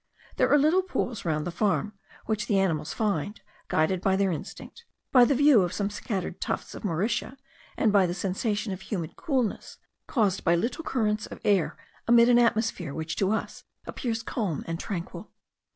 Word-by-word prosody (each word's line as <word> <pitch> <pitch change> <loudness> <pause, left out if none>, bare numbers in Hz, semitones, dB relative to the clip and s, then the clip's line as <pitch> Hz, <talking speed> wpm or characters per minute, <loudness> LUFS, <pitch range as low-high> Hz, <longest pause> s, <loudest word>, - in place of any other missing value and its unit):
There - - +3
are 290 - +7
little 310 +6 +4
pools 245 - -3
round 155 -2 0
the 175 - -3
farm, 205 +3 0 0.3
which 215 -1 -2
the 205 - +2
animals 165 -6 0
find, 205 -2 -2 0.3
guided 175 +3 +1
by 190 0 +2
their 195 -1 +1
instinct, 175 - -8 0.3
by 250 -2 +7
the 275 - +2
view 285 -4 +6
of 175 -2 -1
some 205 0 -2
scattered 195 -4 -4
tufts - - -3
of - - -9
mauritia, 210 +8 -1 0.4
and 215 -3 +2
by 195 -3 +5
the 175 - -3
sensation 205 +2 -2
of 185 - -8
humid 180 -5 -5
coolness, 265 - -2 0.3
caused 205 -7 +1
by 170 -1 +4
little 235 - -2
currents 215 -7 -1
of - - -10
air 195 -5 +2 0.3
amid 235 0 +6
an 240 0 +6
atmosphere 220 -9 +1
which 160 0 -4
to 195 - +1
us 220 - -3 0.2
appears 230 -3 -3
calm 205 - -2
and 165 0 -4
tranquil. 180 -5 -6
205 Hz, 180 wpm, -27 LUFS, 180-235 Hz, 0.4 s, are